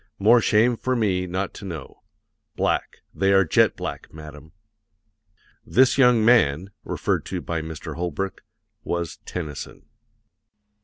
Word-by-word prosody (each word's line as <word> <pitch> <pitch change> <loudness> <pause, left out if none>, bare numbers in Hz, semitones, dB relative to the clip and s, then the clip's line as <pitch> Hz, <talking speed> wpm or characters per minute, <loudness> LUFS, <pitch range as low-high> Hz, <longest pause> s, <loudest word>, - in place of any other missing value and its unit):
More 115 +4 +5
shame 115 +3 +3
for 130 +2 -1
me 95 -6 0
not 95 +2 -3
to - - -11
know. 85 -5 -8 0.5
Black; - - -1
they 95 0 +2
are 95 -1 +5
jet 75 - +3
black, - - -6
madam." 75 0 -12 1.1
"This 130 0 +3
young 125 -5 +4
man" 95 -6 +3
referred - - -1
to 95 - -3
by 85 -1 -3
Mr. 80 -1 -7
Holbrook 90 +3 -4 0.4
was 85 -2 -3
Tennyson. 80 -6 -7
95 Hz, 125 wpm, -23 LUFS, 80-110 Hz, 1.1 s, More